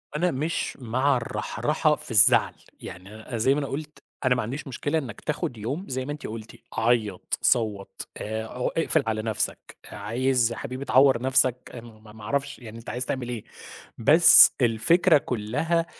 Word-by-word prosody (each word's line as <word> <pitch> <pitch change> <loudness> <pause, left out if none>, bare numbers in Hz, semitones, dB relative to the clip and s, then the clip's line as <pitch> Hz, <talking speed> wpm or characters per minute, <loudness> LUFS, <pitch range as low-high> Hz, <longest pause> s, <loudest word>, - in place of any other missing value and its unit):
أنا 175 +3 +1
مش 155 +5 -3
مع 130 +3 +1
الرحرحة 120 - -1
في - - -12
الزعل، - - +5 0.3
يعني 95 +4 -10
أن - - -11
أنا 115 +2 -6
زي 125 +5 +3
ما 145 - -1
أنا 140 - -3
قُلت 150 +3 -7 0.2
أنا 125 -1 +3
ما 125 - -1
عنديش 130 +7 -6
مشكلة 145 +4 -2
إنّك 135 -6 -6
تاخد 150 -4 -3
يوم 135 - -4
زي 130 0 -3
ما 145 - -5
أنتِ 150 - -7
قُلتِ 110 0 -9 0.2
عيّط 115 -2 -1
صوّت 105 -4 -1
آآ 110 +1 -4
اق 125 +2 -3
اقفل 160 -2 +1
على 110 -1 -1
نفسك، 110 -1 -3
عايز 120 +3 0
يا 115 - -6
حبيبي 130 0 -6
تعوّر 130 -3 +4
نفسك 130 -1 +1
آآ 120 - -7
م 110 -2 -16
م 105 0 -15
ما 105 - -12
أعرفش 140 +5 -3
يعني 115 -3 -10
أنت 115 - -10
عايز 125 +3 -3
تعمل 125 -2 -4
إيه، 120 -3 -5 0.5
بس 160 +8 +7
الفكرة 120 +10 +4
كلها 140 +8 -1
125 Hz, 185 wpm, -25 LUFS, 110-140 Hz, 0.5 s, بس